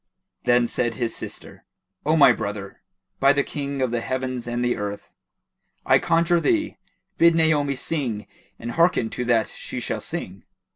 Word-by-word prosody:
Then 120 Hz, -1 st, +4 dB
said 120 Hz, -1 st, -1 dB
his 120 Hz, -2 st, -2 dB
sister, -, -, -7 dB, 0.4 s
"O 155 Hz, -, +4 dB
my 140 Hz, -5 st, +7 dB
brother, 100 Hz, -3 st, -5 dB, 0.4 s
by 140 Hz, +1 st, +5 dB
the 140 Hz, 0 st, +1 dB
King 140 Hz, -2 st, -3 dB
of 125 Hz, -, 0 dB
the 120 Hz, -1 st, -1 dB
heavens 130 Hz, -1 st, -3 dB
and 120 Hz, +1 st, -1 dB
the 120 Hz, -, +1 dB
earth, 100 Hz, 0 st, -6 dB, 0.7 s
I -, -, +5 dB
conjure 170 Hz, +1 st, +2 dB
thee, 315 Hz, -, 0 dB, 0.4 s
bid 170 Hz, 0 st, +6 dB
Naomi 150 Hz, -4 st, +2 dB
sing 130 Hz, -7 st, -3 dB, 0.3 s
and 120 Hz, +1 st, -6 dB
hearken 165 Hz, -7 st, +2 dB
to 125 Hz, -, -3 dB
that 115 Hz, -2 st, +2 dB
she -, -, -6 dB
shall -, -, -3 dB
sing!" 95 Hz, +1 st, -6 dB
130 Hz, 160 wpm, -23 LUFS, 115-150 Hz, 0.7 s, my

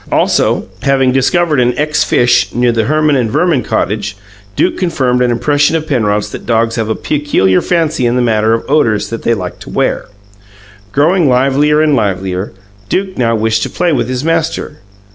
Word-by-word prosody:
Also, -, -, +1 dB, 0.2 s
having 135 Hz, -2 st, +2 dB
discovered 150 Hz, +3 st, +1 dB
an 125 Hz, 0 st, +1 dB
ex 150 Hz, 0 st, +1 dB
fish 120 Hz, 0 st, +1 dB
near 120 Hz, 0 st, +2 dB
the 115 Hz, -2 st, 0 dB
Herman 155 Hz, 0 st, +2 dB
and 120 Hz, -4 st, 0 dB
Verman 165 Hz, +2 st, +1 dB
cottage, 105 Hz, -2 st, -2 dB, 0.4 s
Duke -, -, +1 dB
confirmed 130 Hz, -9 st, 0 dB
an 125 Hz, -, +2 dB
impression 145 Hz, +5 st, +1 dB
of 160 Hz, -1 st, -2 dB
Penrod's 105 Hz, -7 st, -1 dB
that -, -, -9 dB
dogs 115 Hz, -1 st, +1 dB
have 110 Hz, -2 st, -2 dB
a 110 Hz, -, 0 dB
peculiar 145 Hz, -11 st, +1 dB
fancy 160 Hz, -7 st, 0 dB
in 120 Hz, -, 0 dB
the 125 Hz, -, +1 dB
matter 110 Hz, -1 st, +2 dB
of 115 Hz, -, -5 dB
odours 120 Hz, -9 st, +1 dB
that 115 Hz, -, -4 dB
they 115 Hz, -, +1 dB
like 90 Hz, -4 st, -6 dB
to -, -, -11 dB
wear. -, -, -1 dB, 0.8 s
Growing 155 Hz, -, +2 dB
livelier 140 Hz, +4 st, +2 dB
and 150 Hz, -2 st, +2 dB
livelier, 95 Hz, -3 st, -2 dB, 0.4 s
Duke 190 Hz, 0 st, -2 dB
now 115 Hz, -2 st, +1 dB
wished 110 Hz, 0 st, 0 dB
to -, -, -2 dB
play 175 Hz, -2 st, 0 dB
with 125 Hz, -3 st, -1 dB
his 130 Hz, +1 st, -3 dB
master. 165 Hz, -2 st, -2 dB
125 Hz, 180 wpm, -13 LUFS, 115-150 Hz, 0.8 s, having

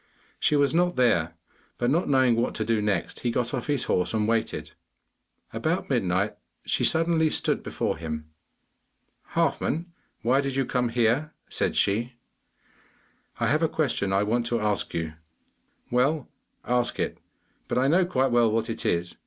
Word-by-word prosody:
She 150 Hz, -, +2 dB
was 145 Hz, 0 st, +3 dB
not 175 Hz, +1 st, +2 dB
there, 85 Hz, -10 st, +2 dB, 0.4 s
but 120 Hz, +1 st, +1 dB
not 170 Hz, +5 st, +1 dB
knowing 130 Hz, -3 st, +4 dB
what 115 Hz, +1 st, 0 dB
to 110 Hz, -, -2 dB
do 110 Hz, -1 st, +1 dB
next, 100 Hz, -4 st, -1 dB
he 120 Hz, -, -1 dB
got 120 Hz, 0 st, -1 dB
off 125 Hz, -3 st, -3 dB
his 145 Hz, -4 st, +1 dB
horse 90 Hz, +4 st, 0 dB
and 105 Hz, -1 st, +1 dB
waited. 115 Hz, 0 st, -1 dB, 0.8 s
About -, -, -1 dB
midnight 95 Hz, +3 st, +1 dB, 0.3 s
she -, -, 0 dB
suddenly 160 Hz, -1 st, +3 dB
stood -, -, 0 dB
before -, -, -2 dB
him. 80 Hz, -1 st, -5 dB, 1.1 s
'Halfman, 170 Hz, +3 st, 0 dB, 0.3 s
why 130 Hz, +4 st, +3 dB
did 140 Hz, -1 st, -3 dB
you 135 Hz, -1 st, +1 dB
come 125 Hz, -1 st, 0 dB
here?' 120 Hz, +6 st, +1 dB, 0.2 s
said -, -, -1 dB
she. 115 Hz, +5 st, +1 dB, 1.3 s
'I -, -, +1 dB
have 155 Hz, +2 st, +2 dB
a 165 Hz, -, +2 dB
question 125 Hz, -10 st, 0 dB
I 100 Hz, +1 st, +2 dB
want 115 Hz, +3 st, 0 dB
to 120 Hz, -1 st, 0 dB
ask 105 Hz, -1 st, 0 dB
you.' 80 Hz, -2 st, -2 dB, 0.8 s
'Well, 135 Hz, +3 st, +1 dB, 0.4 s
ask 125 Hz, 0 st, 0 dB
it; -, -, -2 dB, 0.5 s
but -, -, -1 dB
I 130 Hz, +2 st, +3 dB
know 175 Hz, +6 st, +4 dB
quite 135 Hz, -7 st, +1 dB
well 120 Hz, -2 st, +4 dB
what 115 Hz, +1 st, 0 dB
it -, -, -3 dB
is. 85 Hz, 0 st, -1 dB
120 Hz, 165 wpm, -26 LUFS, 105-140 Hz, 1.3 s, knowing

